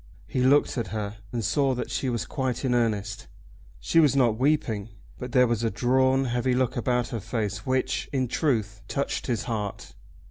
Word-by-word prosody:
He 130 - -2
looked 135 0 +3
at 115 - -2
her, 105 -1 -4
and 115 -3 -2
saw 135 +2 +2
that 125 - -4
she 130 - -1
was 120 -2 -2
quite 130 -1 -2
in 125 - +2
earnest. 105 -3 -1 0.5
She 165 - +2
was 150 -4 +5
not 120 -5 +3
weeping, 125 -7 +1 0.3
but 125 0 -6
there 125 0 +5
was 120 -1 0
a 115 - +2
drawn, 130 +4 +2
heavy 125 +1 0
look 125 -1 +1
about 125 0 0
her 115 - -3
face 105 0 -3
which, 130 0 0
in 130 -3 0
truth, 110 -7 -1
touched 140 - -2
his 120 -5 -1
heart. 105 -4 -4
125 Hz, 185 wpm, -26 LUFS, 110-130 Hz, 0.5 s, was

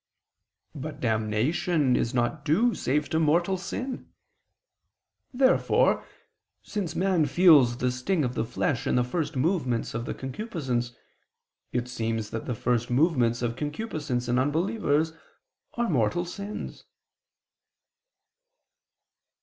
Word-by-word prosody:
But 150 0 -7
damnation 125 +6 +1
is 115 - 0
not 125 +4 -1
due 215 +11 +3
save 150 +3 0
to 160 -1 +1
mortal 170 +4 +2
sin. 245 +8 -5 1.2
Therefore, 260 0 +3 0.6
since 185 -7 -4
man 180 -3 +2
feels 140 -6 +6
the 125 0 0
sting 150 +7 0
of 125 - -2
the - - -1
flesh 120 +2 -1
in - - +2
the 125 - +3
first 150 +4 -3
movements 130 -5 0
of 115 +1 -3
the - - -4
concupiscence, 130 - -3 0.8
it 125 0 -1
seems 115 -3 -3
that 115 - -5
the 125 - -1
first 120 +1 0
movements 125 -4 +2
of 120 -1 -1
concupiscence 150 - -3
in 125 +1 +2
unbelievers 160 - +1 0.6
are 240 0 0
mortal 145 - +1
sins. 200 +4 -7
145 Hz, 115 wpm, -27 LUFS, 120-175 Hz, 1.2 s, feels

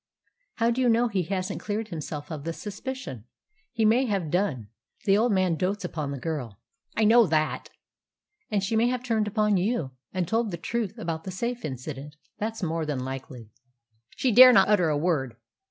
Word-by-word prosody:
"How 230 0 +2
do 250 +2 0
you 250 - +3
know 235 +1 +3
he 200 -4 0
hasn't 190 +2 -3
cleared 215 +1 -3
himself 150 -2 -6
of 150 -3 -5
the 165 +2 -3
suspicion? 210 - -6 0.5
He 225 -2 +1
may 235 +5 +4
have 190 -8 -1
done. 145 - -1 0.4
The 195 - +5
old 225 +3 +3
man 185 -4 +2
dotes 195 +3 -1
upon 155 -5 -4
the 140 - -4
girl." 125 -8 -5 0.4
"I 220 - +3
know 225 +3 +6
all 230 - +6
that." 155 -1 0 0.8
"And 205 -3 0
she 210 +3 -1
may 225 +2 +3
have 250 0 -1
turned 225 -4 0
upon 210 -1 +2
you, 180 - -1 0.2
and 185 -2 -2
told 225 0 +1
the 170 - -4
truth 215 +4 -3
about 165 -1 -4
the - - -6
safe 235 +6 -3
incident. 140 +1 -6 0.2
That's 220 0 -3
more 165 -1 -1
than 140 -4 -3
likely." 130 -4 -7 0.6
"She 255 - +1
dare 255 +3 +10
not 195 -4 +5
utter 180 -6 +4
a 150 - +1
word." 145 -7 0
190 Hz, 195 wpm, -26 LUFS, 155-225 Hz, 0.8 s, dare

